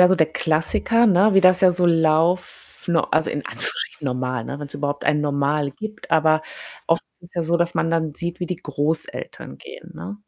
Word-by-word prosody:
ja, 180 - +8
so 185 - +4
der 160 -4 +3
Klassiker, 165 +9 +1
ne, 200 +2 +5
wie 195 - +6
das 185 0 +5
ja 185 -1 +5
so 175 0 +1
lauf 165 +2 +2 0.2
no 170 -1 +3
also, 155 0 +1
in - - -3
Anführungsstrichen 115 +7 -5
normal, 125 -2 -2
ne, 140 - -6
wenn's 145 -1 -8
überhaupt 145 0 -3
ein 150 - +2
Normal 145 0 0
gibt. 215 +6 -9
Aber 155 -1 +3 0.4
oft 165 0 +2 0.2
ist - - -41
es - - -25
ja 170 - -1
so, 170 +1 +1
dass 170 0 0
man 165 - 0
dann 160 -3 -1
sieht, 170 +1 -5
wie 175 - -2
die 180 - -3
Großeltern 155 0 -4
gehen, 475 +1 -12
ne? 205 - -7
165 Hz, 210 wpm, -22 LUFS, 150-180 Hz, 0.4 s, ja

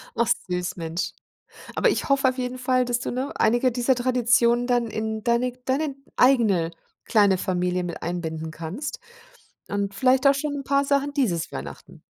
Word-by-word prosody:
Ach 235 - +1 0.2
süß, 180 0 -2
Mensch. 165 +1 -3 0.6
Aber - - +3
ich - - 0
hoffe 275 -1 +3
auf 255 0 -2
jeden 250 0 -3
Fall, 255 0 +2
dass 245 0 -1
du, - - -3
ne, 260 +4 -3
einige 240 +3 +3
dieser 245 +2 +2
Traditionen 245 -1 +2
dann 245 -2 +1
in 220 0 -4
deine 240 +1 +1
deine 280 +2 -1 0.2
eigene 215 -11 +4 0.3
kleine 205 -4 +3
Familie 180 -1 -1
mit 170 - -6
einbinden 160 -2 -4
kannst 165 - -6 0.7
und 200 0 -2
vielleicht 255 +5 +3
auch 275 - +6
schon 290 +1 -2
'n 280 -1 -5
paar 280 +1 +2
Sachen 280 +1 +1
dieses 200 - 0
Weihnachten. 70 +1 -9
240 Hz, 170 wpm, -24 LUFS, 180-260 Hz, 0.7 s, auch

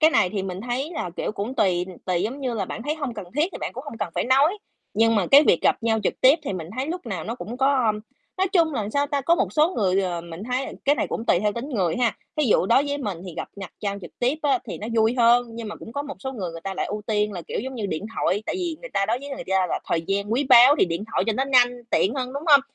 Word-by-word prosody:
Cái 315 0 +6
này 210 - +3
thì 200 -3 -2
mình 185 -1 -5
thấy 250 +6 -3
là, 180 - -4
kiểu, - - -2
cũng 215 +5 -4
tùy 180 -6 +1 0.2
tùy 180 -2 0
giống 265 +6 -3
như 255 -3 -2
là 200 -4 -1
bạn 220 - -6
thấy 295 +4 -1
hông 280 -7 -4
cần 205 - -7
thiết 295 - +3
thì - - -6
bạn - - -3
cũng 255 +4 -8
hông 260 -6 -8
cần - - -2
phải - - 0
nói, 280 - +3 0.4
nhưng 225 +1 +4
mà 200 -4 +2
cái 280 +2 +8
việc 170 - +3
gặp - - +4
nhau 225 -1 +2
trực - - +1
tiếp 270 +5 +6
thì 270 - -3
mình 170 -4 -5
thấy 260 +2 -1
lúc 335 -4 -5
nào 185 -7 -4
nó 230 +4 -3
cũng 245 0 -7
có, 265 -2 +2
ưm, 210 -1 0 0.4
nói 380 - +3
chung 330 -5 +3
là, 215 -5 -2
sao 285 0 +1
ta, 285 -1 -1
có 335 +6 +3
một - - -1
số 310 +1 +4
người, 195 -2 +2
ờ, 175 -2 -2
mình 170 +2 -9
thấy 250 +3 -1 0.2
cái 285 - +4
này - - -1
cũng 225 - -3
tùy - - +4
theo 210 0 +1
tính 235 +6 -5
người 190 - 0
ha. 240 -3 +1 0.2
Thí 305 - +2
dụ 210 -6 +3
đối 250 +7 +4
với 285 0 -2
mình 205 -10 -4
thì 180 - -8
gặp - - -4
nhặt 195 -2 -8
nhau 200 -1 -2
trực 175 - -9
tiếp 250 +4 +1
á 275 -3 +3
thì - - -6
nó 210 - -6
vui 220 +1 +3
hơn, 240 +1 +5
nhưng 230 -2 -5
mà 210 - -7
cũng 225 - -11
có 285 - -2
một 285 -1 -7
số 265 -1 -5
người 190 -9 -4
người 165 - -8
ta 195 +3 -5
lại - - -2
ưu 210 +1 -5
tiên 210 -1 0
là, 175 -3 -6
kiểu, - - -4
giống 265 +4 -6
như, 220 -5 -3
điện 190 +3 -4
thoại, 205 +3 +1
tại - - -2
vì 345 -3 -3
người - - -9
ta 195 - 0
đối 230 +3 0
với 280 +2 -9
người 275 -1 -6
ta 190 -1 +3
là - - -2
thời 165 - 0
gian 200 +2 -1
quý 265 +4 +1
báu 255 +3 +8
thì - - +5
điện 170 +3 -3
thoại - - +1
cho 225 - +2
nó 260 +5 0
nhanh, 255 -3 +5 0.2
tiện 210 - +2
hơn, 255 -2 -3
đúng 280 +1 -4
hông? 285 -3 +8
235 Hz, 315 wpm, -24 LUFS, 200-275 Hz, 0.4 s, cái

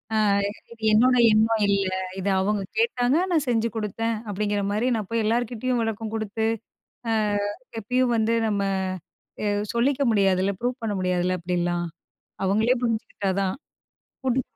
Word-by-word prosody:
ஆ - - +3 0.5
இது 230 -1 -14
என்னோட 250 +4 +5 0.2
எண்ணம் 220 0 +3
இல்ல. 195 -1 +2 0.3
இத 190 - -3
அவங்க 205 +1 0 0.2
கேட்டாங்க, 300 - +2
நான் 315 -4 +2
செஞ்சு 230 -1 +1
குடுத்தேன்" 225 +1 -1 0.2
அப்டிங்கிற 205 +1 -1
மாரி, 225 +5 +1
நான் 210 -3 -5
போய் 230 -1 0
எல்லார்கிட்டேயும் 240 +2 0
விளக்கம் 225 0 -3
குடுத்து, 220 +1 -1 0.6
ஆ - - +2 0.7
எப்பயும் 250 +3 +1
வந்து 225 +1 +2
நம்ம 205 -2 0 0.8
அ - - +1 0.3
சொல்லிக்க 260 +4 +1
முடியாதுல்ல 195 -2 +2
ப்ரூஃப் 245 +1 -2
பண்ண 210 -2 -1
முடியாதுல்ல 180 0 0
அப்டிலாம். 175 0 -1 0.6
அவங்களே 220 +6 +3
புரிஞ்சுகிட்டா 220 -4 -1
தான். 190 -1 0 0.7
போட்டு 260 0 +1
220 Hz, 135 wpm, -25 LUFS, 200-240 Hz, 0.8 s, என்னோட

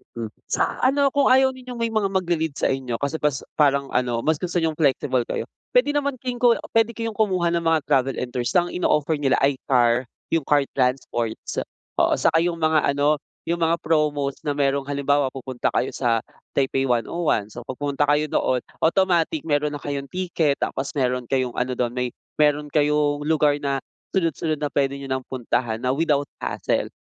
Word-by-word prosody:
Mm, 115 -2 -5 0.2
sa - - 0
ano 275 +1 +3
kung 280 -1 +3
ayaw 265 +1 +5
ninyong 255 -1 -9
may 230 -1 -1
mga 215 -3 +1
magli-lead 170 -6 -1
sa - - +1
inyo 130 -3 -2
kasi 140 +6 -2
pas 145 -3 0 0.2
parang 140 -2 +3
ano 120 -2 0
mas 155 -1 +1
gusto 180 0 -4
niyong 160 - +2
flexible 130 -4 +1
kayo - - -2 0.3
pwede - - +4
naman 285 -2 0
kin 250 -1 -5
ko 240 -1 +5 0.2
pwede 225 0 +2
kayong 230 -1 -3
kumuha 185 -5 +1
ng 170 - +1
mga 165 -2 +1
travel 135 -2 +1
and 125 - -4
tours 120 0 -2
ng 175 -1 +3
ino-offer 150 -3 +1
nila 135 -3 +2
ay 135 -1 +2
car, 120 -1 +3 0.2
yung 165 -4 0
car 145 -1 +4
transports 125 -3 -1 0.4
oo - - +4
saka 165 - +3
yung 170 +1 0
mga 155 -3 +3
ano 145 +1 +2 0.2
yung 170 +1 -2
mga 165 0 +3
promos 150 -3 0
na 145 - 0
merong 140 -1 0
halimbawa 140 0 +1
pupunta 130 -2 -3
kayo - - +1
sa 115 -3 0 0.3
Taipei 135 -1 +1
101 120 -2 0
so 120 - -8
pag 130 - -4
pumunta 145 +1 0
kayo 150 +1 +2
doon 125 -1 +1 0.2
automatic 170 -4 +1
meron 150 -1 0
na 145 - -8
kayong 140 -1 -3
ticket 170 -3 0
tapos 135 +3 -3
meron 125 -3 0
kayong 130 -1 0
ano 125 +1 -1
dun 120 -1 -1
may 125 0 -1 0.3
meron 150 0 +2
kayong 150 -1 +2
lugar 150 -2 +3
na 140 -2 -2 0.3
sunod-sunod 160 -4 0
na 145 - -1
pwede 140 -1 +1
'nyo 140 -1 -7
ng 130 0 -1
puntahan 120 -2 -1
na 125 - +2
without 145 0 +1 0.2
hassle, - - -1
145 Hz, 190 wpm, -23 LUFS, 130-165 Hz, 0.4 s, ayaw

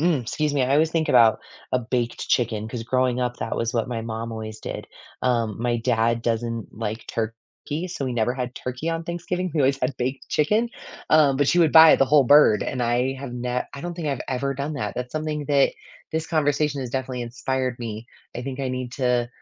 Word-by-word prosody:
Mm, 160 -5 +2
excuse 150 +5 -1
me. 140 - +2
I 130 +1 +1
always 155 +2 +3
think 160 -1 0
about 115 -5 +5 0.3
a 130 - +3
baked 120 0 -2
chicken, 110 -3 0
'cause 115 0 -5
growing 125 +1 +1
up, 125 -1 -2
that - - -3
was 115 +2 -1
what 115 -1 0
my 120 -2 -3
mom 115 0 -4
always 110 -1 -6
did, - - -6 0.4
um, 115 -4 +1
my 120 0 +1
dad 115 -1 +1
doesn't 115 -1 -2
like 110 +1 -4
turkey, 115 +9 -5
so 165 -6 -4
we 130 - -2
never 120 0 +1
had 125 -1 -4
turkey 130 +5 -4
on 165 0 -2
Thanksgiving, 175 +2 -3
we 155 - +2
always 135 0 +3
had 125 +1 -1
baked 130 +2 -3
chicken, 215 +10 +2 0.4
um, 150 -3 +5
but 145 0 +2
she 175 - +3
would 160 -3 +4
buy 160 -1 +9
the - - +4
whole 145 +1 +5
bird, 135 -5 +6
and 130 - -3
I 120 +3 +1
have 135 -2 -7
ne 125 0 -2
I 140 - -7
don't 175 0 -4
think 165 -2 -5
I've 135 -3 -2
ever 140 +1 -1
done 140 +3 -3
that. 105 -7 -3
That's 125 0 -4
something 155 -1 -3
that 140 -1 +4 0.4
this 160 0 -1
conversation 150 -2 +1
has 125 -2 -5
definitely 130 -1 -3
inspired 130 +1 -2
me. 110 -1 -5 0.3
I 120 - -4
think 135 +1 -5
I 135 - -1
need 130 -1 -4
to 125 -2 +1
130 Hz, 220 wpm, -24 LUFS, 120-145 Hz, 0.4 s, buy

